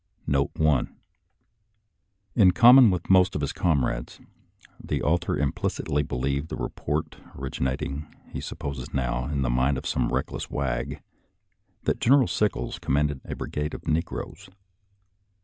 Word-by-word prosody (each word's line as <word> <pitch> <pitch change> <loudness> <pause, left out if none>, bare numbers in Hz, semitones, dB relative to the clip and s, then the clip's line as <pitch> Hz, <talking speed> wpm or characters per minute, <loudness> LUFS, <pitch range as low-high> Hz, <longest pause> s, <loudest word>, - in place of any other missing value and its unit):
Note 70 -1 +1
1 75 -5 +1 0.7
— 105 -2 -47
In 100 -6 +6
common 120 +3 +8
with 90 -3 -2
most 95 0 +5
of 75 - -1
his 70 0 -2
comrades, 65 -8 -1 0.6
the - - -2
author 85 +3 +1
implicitly 75 - -1
believed 70 +3 -2
the 80 - -4
report, - - -3 0.2
originating, 65 +2 -3 0.2
he - - -6
supposes 70 -3 -6
now, 60 -2 -1
in 70 -1 -1
the 65 - 0
mind 65 +3 +2
of - - -6
some - - 0
reckless - - -3
wag, 65 -4 -3 0.8
that - - 0
General 135 0 +5
Sickles 105 -1 -1
com 70 - -1
manded 75 -2 0
a - - -5
brigade 75 0 -4
of - - -11
negroes. 80 +3 -3
75 Hz, 140 wpm, -26 LUFS, 65-90 Hz, 0.8 s, common